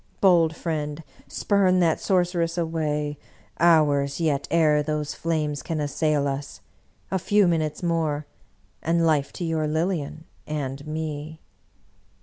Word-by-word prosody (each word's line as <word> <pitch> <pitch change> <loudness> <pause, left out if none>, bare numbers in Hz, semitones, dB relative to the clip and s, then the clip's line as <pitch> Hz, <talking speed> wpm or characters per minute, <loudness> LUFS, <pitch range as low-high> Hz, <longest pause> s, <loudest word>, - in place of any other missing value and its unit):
Bold 170 -4 +4
friend, 155 -2 -3 0.2
spurn 195 -3 +2
that 165 -2 +2
sorceress 175 -3 +1
away. 150 -3 -1 0.4
Hours 145 -4 +3
yet 150 -4 0
ere 155 -2 +4
those 150 0 -2
flames 155 -3 -2
can 160 -2 -3
as 145 -2 -2
sail 150 -2 +1
us! 140 +1 -5 0.5
A 190 - +1
few 205 +2 +3
minutes 160 -1 -1
more, 160 -3 0 0.6
and 165 +1 +1
life 150 -3 +2
to 175 - -4
your 160 -2 0
Lilian 160 -1 -2 0.2
and 140 -1 -4
me!" 155 0 -5
155 Hz, 130 wpm, -25 LUFS, 150-170 Hz, 0.6 s, Bold